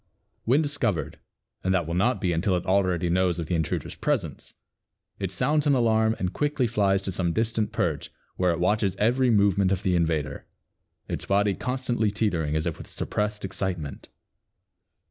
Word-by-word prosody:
When 135 +7 +3
discovered 115 - -1 0.4
and 95 0 +2
that 85 -3 +1
will 85 - -4
not 115 +8 +2
be 90 -4 0
until 90 +3 +1
it 90 - -2
already 95 -2 +2
knows 90 0 +2
of 85 - -3
the 80 - -3
intruder's 80 -3 -1
presence, 105 - -3 0.6
it - - -2
sounds 150 0 +1
an 140 - +4
alarm 110 -2 +3
and 90 0 -2
quickly 145 -3 0
flies 100 -4 +1
to 95 - -3
some 85 -2 -1
distant 110 0 0
perch - - -1 0.3
where 90 -1 +1
it 85 - -2
watches 100 +1 +1
every 125 +4 +2
movement 100 -3 +3
of 95 0 -1
the 95 -3 +2
invader, 80 -4 -1 0.6
its - - -4
body 100 0 +2
constantly 125 -2 -1
teetering 90 -8 -1
as 80 +1 0
if 85 -3 -3
with - - -9
suppressed 105 -1 -2
excitement. 90 -7 -4
100 Hz, 170 wpm, -26 LUFS, 90-115 Hz, 0.6 s, an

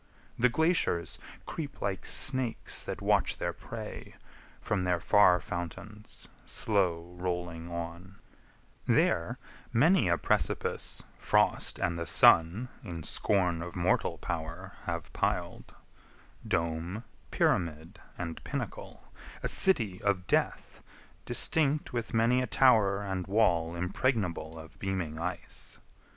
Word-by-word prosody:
The 125 +2 +5
glaciers 160 - +1 0.3
creep 145 -3 -6
Like 100 -2 -3
snakes 130 -4 +2
that - - -6
watch - - +2
their - - -2
prey, - - -8 0.4
from 90 - -1
their 90 -1 +1
far 90 -1 +5
fountains, 90 +5 -8 0.2
Slow 90 -5 0
rolling 90 -2 -4
on; 85 +2 -7 0.7
there, 85 - +2 0.3
many 160 - +4
a 85 - +3
precipice - - 0 0.2
Frost - - +2
and 85 -1 -1
the 85 - -4
Sun 90 +10 +5
in 85 -2 -6
scorn 90 -2 +1
of 85 0 -7
mortal 90 0 +1
power 85 +3 -5
Have 85 -2 -4
pil'd: - - -2 0.8
dome, 85 +6 -2 0.3
pyramid, 85 +3 -1 0.2
and 85 -2 -6
pinnacle, - - -6 0.4
A - - 0
city 110 - +3
of 100 -3 0
death, - - -1 0.4
distinct 150 -3 +2
with 120 -2 -3
many 115 +3 +3
a 125 - -2
tower 105 -6 +4
And 95 -2 -3
wall 85 -6 +2
impregnable 90 -4 -1
of 80 0 -12
beaming 90 -5 -3
ice. 85 +2 -6
90 Hz, 115 wpm, -30 LUFS, 85-110 Hz, 0.8 s, The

